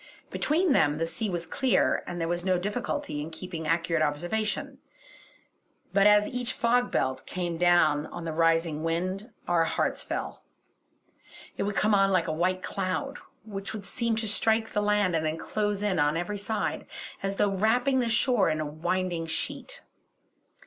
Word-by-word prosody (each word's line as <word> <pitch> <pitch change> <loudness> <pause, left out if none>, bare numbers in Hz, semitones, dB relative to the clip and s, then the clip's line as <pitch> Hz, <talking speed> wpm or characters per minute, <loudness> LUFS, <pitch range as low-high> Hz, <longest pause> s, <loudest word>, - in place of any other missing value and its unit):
Between 330 +3 +1
them 145 - +3
the 165 - 0
sea 215 +6 -3
was 175 -2 -3
clear, 260 -7 +1
and 175 0 -4
there 165 - -1
was 175 +1 -1
no 185 -1 +2
difficulty 205 - -3
in 155 - -5
keeping 165 -1 -6
accurate 165 0 +1
observation; 175 +9 -1 1.1
but 200 +1 +5
as 210 0 +5
each 250 0 -2
fog 245 +1 +2
belt 130 0 -1
came 175 -2 -3
down 165 -4 +4
on 175 -1 -7
the 165 - -2
rising 165 -1 +2
wind 185 +7 -2 0.2
our 170 -2 +3
hearts - - -1
fell. - - -5 1.1
It - - -4
would 205 - -5
come 210 +1 +2
on 195 -1 +4
like 185 -3 +2
a - - 0
white 185 +3 0
cloud, 200 +9 -3 0.3
which 200 -2 -5
would 205 -2 -7
seem 230 +3 -1
to 220 0 -2
strike 220 +1 +1
the 210 - 0
land 205 -4 +2
and 160 - 0
then 155 +1 -1
close 205 +2 -2
in 195 -5 +1
on 145 +2 +2
every 200 +4 -3
side, 215 +2 -2 0.3
as 195 0 -2
though 205 0 +2
wrapping 245 +7 +2
the 240 -2 +1
shore 235 -1 +3
in 155 - -1
a 155 - -1
winding 165 +2 -2
sheet. - - -4
185 Hz, 175 wpm, -28 LUFS, 165-215 Hz, 1.1 s, but